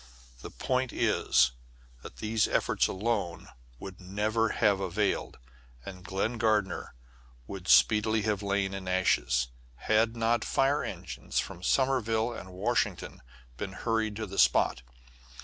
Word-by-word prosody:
The - - -8
point 130 -1 -1
is 60 0 +2 0.5
that - - -11
these 110 0 +1
efforts - - +1
alone 95 -4 -2 0.3
would 95 +7 -10
never 105 +4 0
have 100 -2 +2
availed, 100 +2 -1 0.5
and 90 -2 -9
Glen 105 +5 -2
Gardner 110 - 0 0.5
would 95 +4 -8
speedily 110 0 +4
have 105 -2 -1
lain 100 -1 -1
in 95 -1 -6
ashes, 65 -9 +1 0.3
had 110 - +1
not 115 0 +1
fire 135 +2 +1
engines 85 -7 -6
from 85 - -2
Sommerville 120 -1 +1
and 95 -4 -9
Washington 100 -1 -2 0.4
been 100 -2 -5
hurried 110 0 -1
to 110 +1 -4
the 95 -1 -5
spot. 65 - +3
105 Hz, 130 wpm, -29 LUFS, 95-115 Hz, 0.5 s, speedily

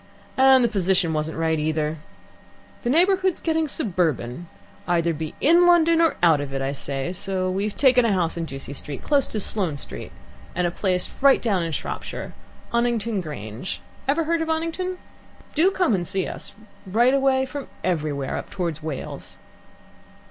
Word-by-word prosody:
And 265 -1 +6
the - - +4
position 190 -5 +1
wasn't 155 +1 -2
right 160 -1 +1
either. 155 0 -1 0.8
The 240 - -2
neighbourhood's 370 +4 +3
getting 320 -1 0
suburban. 170 - -1 0.4
Either 170 -1 +2
be 155 0 -5
in 340 +4 +5
London 335 -1 +5
or 330 - +3
out 160 -4 +5
of 135 -1 -5
it, - - -1
I 135 0 -1
say; 140 +3 -2
so 185 0 -1
we've 200 +2 -2
taken 255 -3 +5
a 230 - +2
house 175 -4 0
in 170 -1 -3
Ducie 135 -2 -6
Street, 140 0 -5
close 285 -3 +2
to 215 - -3
Sloane 190 -7 0
Street, - - -7 0.4
and 180 0 +1
a 175 - 0
place 180 0 0
right 275 0 +6
down 200 -6 0
in 165 -1 -2
Shropshire - - -5 0.4
Oniton 235 -3 +1
Grange. 125 - -6 0.3
Ever 295 +4 +2
heard 330 +1 0
of 325 - -1
Oniton? 330 +3 -2 0.6
Do 330 +5 +4
come 370 - +1
and 175 -3 -1
see 190 -1 -1
us - - -7 0.3
right 235 +7 +3
away 270 -1 +3
from 280 +1 -6 0.2
everywhere, 150 -6 -1
up - - -6
towards 170 -5 -3
Wales. 155 -4 -6
190 Hz, 170 wpm, -23 LUFS, -, 0.8 s, And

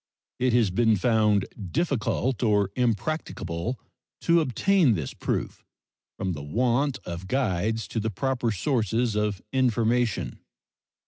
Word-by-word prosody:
It 125 -1 +2
has 115 -6 +3
been 110 +2 +3
found 105 -2 +3 0.3
difficult 135 -5 0
or 105 -4 +2
impracticable 115 - -2 0.4
to 170 0 +4
obtain 155 - +3
this 75 -7 -4
proof, - - -3 0.5
from 95 -2 -2
the 75 - -6
want 125 - +1
of 85 +2 -6
guides 110 -2 0
to 115 - -2
the 110 +1 -1
proper 120 +2 -1
sources 115 +1 0
of 105 -3 -1
information. 120 -2 +1
115 Hz, 120 wpm, -26 LUFS, 100-130 Hz, 0.5 s, to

